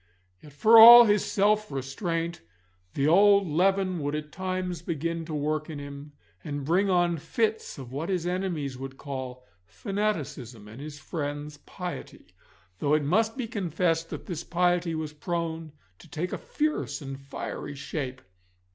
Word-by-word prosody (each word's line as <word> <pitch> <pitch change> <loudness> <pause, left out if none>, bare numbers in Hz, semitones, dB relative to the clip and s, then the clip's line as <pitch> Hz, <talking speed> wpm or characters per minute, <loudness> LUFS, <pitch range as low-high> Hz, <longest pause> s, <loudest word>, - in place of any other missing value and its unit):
Yet 150 - -14
for 220 +10 +6
all 235 +1 +12
his 205 -2 +3
self 210 0 +1
restraint 165 +6 -3 0.5
the 140 +1 +1
old 200 +3 +5
leaven 185 +3 +1
would 145 0 -2
at 150 0 -5
times 185 -2 -3
begin 165 0 -3
to 160 - -7
work 155 +1 -2
in 155 - -6
him, 140 +1 -9 0.3
and 145 -2 -5
bring 185 +6 +2
on 175 -2 +2
fits 215 +8 -2
of 130 -3 -9
what 145 +6 -4
his 180 -3 -1
enemies 175 -8 -2
would 135 0 -7
call 130 -3 -7 0.2
fanaticism 135 - -4
and 110 +5 -11
his 150 0 -8
friends 145 0 -5
piety, 175 - -8 0.5
though 145 +1 +2
it 155 - +1
must 220 - +1
be 255 - -2
confessed 170 - -1
that - - -7
this 170 -3 -5
piety 175 -1 +1
was 155 -1 -4
prone 165 0 -4 0.3
to - - -16
take 175 +2 -4
a - - -2
fierce 305 -8 -2
and 135 0 -7
fiery 140 +1 -6
shape. 135 -2 -5
165 Hz, 155 wpm, -27 LUFS, 145-185 Hz, 0.5 s, all